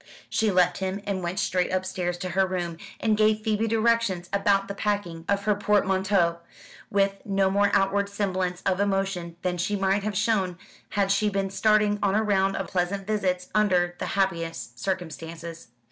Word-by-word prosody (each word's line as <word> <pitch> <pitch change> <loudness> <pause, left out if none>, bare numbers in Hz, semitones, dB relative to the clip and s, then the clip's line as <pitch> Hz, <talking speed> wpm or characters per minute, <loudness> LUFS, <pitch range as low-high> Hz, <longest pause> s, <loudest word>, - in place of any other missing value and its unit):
She 220 - +2
left 180 -1 +3
him, 190 +1 -2
and 195 -2 -2
went 175 +2 -3
straight 180 -1 0
upstairs 185 -1 -2
to 185 +1 -4
her 190 +2 +2
room, 175 -3 -3 0.2
and 220 -1 +2
gave 215 0 +3
Phoebe 220 +1 0
directions 225 -5 +1
about 200 0 +2
the 200 - -4
packing 200 -5 -2
of 200 0 +1
her 210 +1 +3
portmanteaux, 195 -4 +2 0.5
with 195 0 +1
no 195 -1 +1
more 200 +1 +3
outward 200 +1 +2
semblance 185 -3 -2
of 190 -1 +1
emotion 195 -4 -1
than 180 -1 -1
she 205 +4 0
might 195 +1 +1
have 205 -1 -2
shown 200 -5 +1 0.3
had 200 -1 +1
she 210 +1 +2
been 195 -1 -2
starting 210 0 +3
on 200 -1 +2
a 215 - +2
round 195 -2 +2
of 195 - -2
pleasant 190 +2 -2
visits 185 -4 -1
under 180 -5 +2
the - - -3
happiest 165 - -2
circumstances. 165 -2 -5
195 Hz, 175 wpm, -26 LUFS, 180-205 Hz, 0.5 s, left